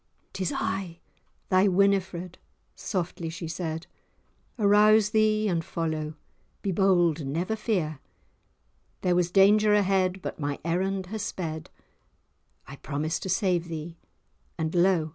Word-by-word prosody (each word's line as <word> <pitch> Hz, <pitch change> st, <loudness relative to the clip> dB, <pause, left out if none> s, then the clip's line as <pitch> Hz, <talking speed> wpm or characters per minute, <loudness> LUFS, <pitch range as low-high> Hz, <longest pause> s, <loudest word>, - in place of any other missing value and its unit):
"'Tis 185 Hz, -2 st, -2 dB
I, 190 Hz, -3 st, -2 dB
'tis -, -, -35 dB, 0.5 s
thy 185 Hz, +2 st, +4 dB
Winifred!" 185 Hz, -2 st, +1 dB, 0.4 s
softly 175 Hz, -3 st, -3 dB
she 165 Hz, +1 st, -6 dB
said, 165 Hz, 0 st, -4 dB, 0.7 s
"Arouse 210 Hz, 0 st, +5 dB
thee 215 Hz, 0 st, +2 dB
and 170 Hz, -4 st, 0 dB
follow, 155 Hz, -2 st, -3 dB, 0.5 s
be 195 Hz, -, 0 dB
bold, 175 Hz, -4 st, +3 dB
never 170 Hz, +10 st, -2 dB
fear, 180 Hz, -, -1 dB, 1.0 s
There 180 Hz, -, +2 dB
was 175 Hz, -1 st, +2 dB
danger 210 Hz, +3 st, +5 dB
ahead, 190 Hz, -2 st, +1 dB
but -, -, -5 dB
my 145 Hz, -1 st, -2 dB
errand 190 Hz, +3 st, -1 dB
has 220 Hz, -, -3 dB
sped, 160 Hz, -5 st, -5 dB, 1.0 s
I 140 Hz, -, -10 dB
promised 155 Hz, +3 st, -3 dB
to 190 Hz, -, -5 dB
save 180 Hz, -3 st, +1 dB
thee, 165 Hz, 0 st, -7 dB, 0.6 s
and 160 Hz, -1 st, -2 dB
lo! 175 Hz, -3 st, +3 dB
180 Hz, 125 wpm, -27 LUFS, 165-195 Hz, 1.0 s, Arouse